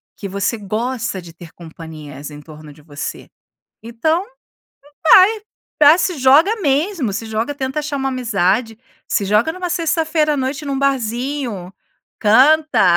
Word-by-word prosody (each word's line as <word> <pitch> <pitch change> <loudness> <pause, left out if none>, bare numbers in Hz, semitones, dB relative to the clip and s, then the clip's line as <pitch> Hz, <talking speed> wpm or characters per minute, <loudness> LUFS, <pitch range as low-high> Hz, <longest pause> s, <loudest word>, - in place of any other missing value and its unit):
Que 200 - -7
você 200 +4 -2
gosta 225 0 -3
de 170 -1 -13
ter 170 -1 -13
companhias 155 -4 -10
em 145 - -10
torno 155 0 -13
de 150 - -18
você. 145 -2 -7 0.5
Então, 315 +11 -1 0.8
vai, 370 -5 +4
se 360 -2 -1
joga 295 - +4
mesmo, 290 - 0
se 225 +3 -4
joga, 220 +6 -3
tenta 265 0 -3
achar 295 -1 -4
uma 270 0 -1
amizade, 225 -2 0 0.3
se 200 - 0
joga 210 +10 +2
numa 365 +1 -5
sexta-feira 320 -2 0
à - - -3
noite 275 +3 -3
num 275 -1 -2
barzinho. 245 -6 -2 0.5
Canta, 250 - +4
250 Hz, 140 wpm, -18 LUFS, 195-300 Hz, 0.8 s, vai